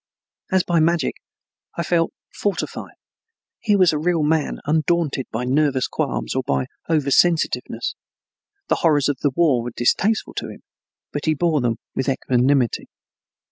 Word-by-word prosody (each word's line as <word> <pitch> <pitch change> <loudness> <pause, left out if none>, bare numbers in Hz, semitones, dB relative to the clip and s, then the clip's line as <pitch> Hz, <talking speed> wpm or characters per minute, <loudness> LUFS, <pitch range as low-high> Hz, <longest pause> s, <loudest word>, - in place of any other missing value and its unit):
As 190 -1 +3
by 170 -1 +1
magic 165 -2 +2 0.6
I 170 - 0
felt 165 0 +1 0.2
fortified. 205 -2 -3 0.6
Here 210 -3 +2
was 185 -4 +4
a 150 - -1
real 165 0 +1
man 155 0 +1
undaunted 155 -2 0
by 120 +3 -2
nervous 135 0 +1
qualms - - -2
or - - 0
by 65 -1 -1 0.2
over 150 -4 +1
sensitiveness. 170 +2 +1 0.7
The - - +1
horrors 150 -5 +2
of 140 -2 -2
the 145 - +2
war 135 -3 +2
were 120 - -4
distasteful 210 - +1
to - - -3
him, - - -12 0.5
but - - -3
he 155 -1 +2
bore 160 -2 +1
them 120 -2 0 0.2
with 130 +1 -1
equanimity. 130 -1 +1
150 Hz, 150 wpm, -21 LUFS, 130-170 Hz, 0.7 s, was